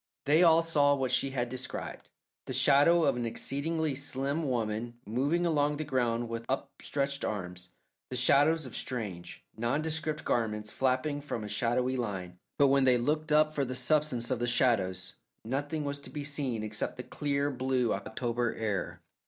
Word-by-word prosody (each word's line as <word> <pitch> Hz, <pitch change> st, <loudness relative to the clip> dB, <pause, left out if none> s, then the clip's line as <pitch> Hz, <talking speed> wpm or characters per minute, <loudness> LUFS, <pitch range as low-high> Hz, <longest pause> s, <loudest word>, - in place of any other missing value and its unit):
They 150 Hz, +4 st, +4 dB
all 165 Hz, -1 st, +6 dB
saw 145 Hz, -3 st, +3 dB
what 130 Hz, -2 st, -1 dB
she 135 Hz, +1 st, +2 dB
had 125 Hz, -2 st, -1 dB
described 130 Hz, +1 st, -6 dB, 0.4 s
the -, -, -3 dB
shadow 145 Hz, +6 st, +5 dB
of -, -, +3 dB
an 120 Hz, -, -2 dB
exceedingly 155 Hz, +6 st, -2 dB
slim 140 Hz, +2 st, -2 dB
woman 115 Hz, -1 st, -2 dB
moving 140 Hz, +10 st, 0 dB
along 150 Hz, -3 st, +1 dB
the 155 Hz, -, -2 dB
ground 120 Hz, -4 st, 0 dB
with 115 Hz, 0 st, -4 dB
up 135 Hz, -, -2 dB
stretched 140 Hz, 0 st, -2 dB
arms, 90 Hz, -3 st, -4 dB, 0.4 s
the 130 Hz, -, -4 dB
shadows 145 Hz, +5 st, +4 dB
of 130 Hz, -, -8 dB
strange, 105 Hz, -9 st, -5 dB
nondescript 155 Hz, +6 st, -1 dB
garments 110 Hz, -2 st, -1 dB
flapping 135 Hz, +3 st, 0 dB
from 120 Hz, -6 st, -4 dB
a -, -, -5 dB
shadowy 120 Hz, +5 st, 0 dB
line, 95 Hz, -7 st, -4 dB, 0.2 s
but 140 Hz, -1 st, +5 dB
when 135 Hz, 0 st, +4 dB
they 125 Hz, -1 st, +5 dB
looked 150 Hz, +5 st, -1 dB
up 155 Hz, 0 st, +4 dB
for 145 Hz, -, 0 dB
the 130 Hz, -1 st, -3 dB
substance 135 Hz, -4 st, +1 dB
of 125 Hz, -, 0 dB
the 120 Hz, -, 0 dB
shadows 95 Hz, -7 st, +1 dB, 0.3 s
nothing 145 Hz, +5 st, -2 dB
was 140 Hz, 0 st, -3 dB
to 140 Hz, -, -10 dB
be 150 Hz, -2 st, -5 dB
seen 140 Hz, -6 st, -2 dB
except 110 Hz, 0 st, -3 dB
the 125 Hz, -, -5 dB
clear, 145 Hz, 0 st, -1 dB
blue 130 Hz, -2 st, 0 dB
October 120 Hz, +3 st, -2 dB
air. 105 Hz, -4 st, -3 dB
130 Hz, 170 wpm, -30 LUFS, 115-145 Hz, 0.4 s, all